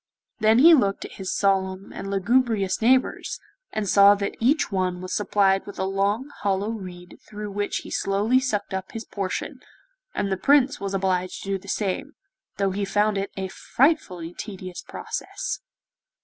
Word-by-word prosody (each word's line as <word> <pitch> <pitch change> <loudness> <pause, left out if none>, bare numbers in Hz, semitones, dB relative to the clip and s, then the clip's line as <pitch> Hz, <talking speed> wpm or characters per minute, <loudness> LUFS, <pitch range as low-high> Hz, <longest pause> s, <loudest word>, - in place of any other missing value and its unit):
Then 220 +1 +5
he 330 +7 +8
looked 200 -10 +2
at - - -9
his 190 - -3
solemn 190 -1 0
and 195 - -6
lugubrious 205 0 +1
neighbours, 255 +3 +2 0.3
and 215 -2 -2
saw 200 +2 +7
that 200 0 -3
each 265 +5 +2
one 185 -2 0
was 185 0 -5
supplied 195 -2 +2
with 200 - -8
a - - -1
long 200 +8 0
hollow 200 +1 0
reed 180 -5 -9
through 210 -1 -6
which 205 +1 -2
he - - -9
slowly 205 +6 +2
sucked 215 -7 -2
up 190 0 -4
his 225 -1 -6
portion, 195 -2 -4 0.6
and 200 - -1
the 190 - +1
Prince 275 +3 +3
was 195 0 -3
obliged 185 -1 -1
to 195 - -7
do 195 -1 0
the 200 - -16
same, 205 +9 -2 0.4
though 195 -1 +1
he 200 +2 -2
found 210 +1 +1
it 195 0 -2
a 190 0 -2
frightfully 185 - 0
tedious 185 -4 -7
process. - - -5
200 Hz, 170 wpm, -24 LUFS, 190-220 Hz, 0.6 s, he